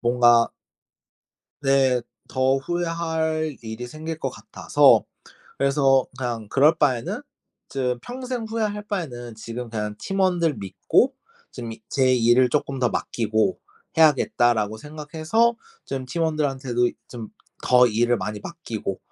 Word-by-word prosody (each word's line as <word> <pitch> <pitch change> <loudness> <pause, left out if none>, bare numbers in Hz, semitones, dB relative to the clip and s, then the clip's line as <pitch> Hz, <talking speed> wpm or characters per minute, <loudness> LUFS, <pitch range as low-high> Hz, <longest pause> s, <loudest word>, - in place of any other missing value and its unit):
뭔가 120 -1 +4 1.1
네. 135 -2 +3 0.3
더 130 +1 +2
후회할 160 -1 -2
일이 110 +2 -6
생길 155 +4 -6
것 - - -2
같아서 - - +3 0.5
그래서 135 -1 +3
그냥 120 -5 -4
그럴 150 +4 +4
바에는 130 -7 0 0.5
즈 125 -2 -1
평생 250 -1 -5
후회할 215 -2 -2
바에는 125 - -4
지금 115 +2 -7
그냥 105 -2 -3
팀원들 180 -5 +1
믿고 100 - +1 0.4
지금 120 -3 -7
이 110 0 -12
제 130 -2 +3
일을 120 +1 +4
'쪼끔 140 0 -1
더 125 -1 +2
맡기고 110 - 0 1.0
해야겠다.'라고 110 +1 -2
생각해서 155 - 0 0.3
좀 135 -1 -4
팀원들한테도 135 -5 0 0.2
좀 115 -3 -8 0.4
더 125 0 +6
일을 120 +2 +2
많이 105 +1 -4
맡기고 115 - -5
130 Hz, 255 characters per minute, -23 LUFS, 120-160 Hz, 1.1 s, 더